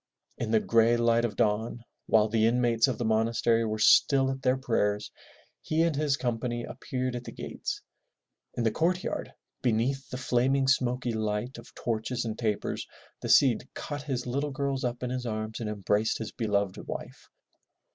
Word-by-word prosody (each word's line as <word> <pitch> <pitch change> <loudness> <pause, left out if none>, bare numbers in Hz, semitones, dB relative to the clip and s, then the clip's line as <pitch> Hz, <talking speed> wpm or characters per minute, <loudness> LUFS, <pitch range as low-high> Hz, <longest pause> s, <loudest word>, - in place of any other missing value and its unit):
In 115 - -2
the 110 0 +4
gray 115 +1 +3
light 115 0 +3
of 115 - -3
dawn, 110 +2 0 0.2
while 110 -1 +4
the 110 0 +2
inmates 120 0 +3
of 130 - -1
the 120 - -2
monastery 115 +1 +2
were 110 -1 -1
still 135 +5 +5
at 135 0 -5
their 130 0 +2
prayers, 105 -5 0 0.5
he 160 +1 +1
and 165 -3 +1
his 145 -1 +1
company 120 -1 -2
appeared 130 -1 -4
at 120 - -5
the - - -8
gates. - - -5 0.7
In 120 - -1
the 110 - +2
courtyard, 175 +8 -1 0.3
beneath 125 +4 0
the 125 - -5
flaming 130 +2 +2
smoky 125 -2 +1
light 110 +3 -2
of - - -15
torches 120 +1 -2
and 110 -1 -3
tapers, 110 -3 -2 0.3
the - - -4
Cid 130 -2 +4
caught 145 -1 -5
his 130 -4 -3
little 140 +4 -1
girls 140 -1 -2
up 120 0 -2
in 125 - -2
his 125 -1 -3
arms 110 0 -3
and 110 -2 -3
embraced 105 +1 0
his 110 - -5
beloved 100 -4 -1
wife. - - -7
120 Hz, 175 wpm, -28 LUFS, 110-130 Hz, 0.7 s, still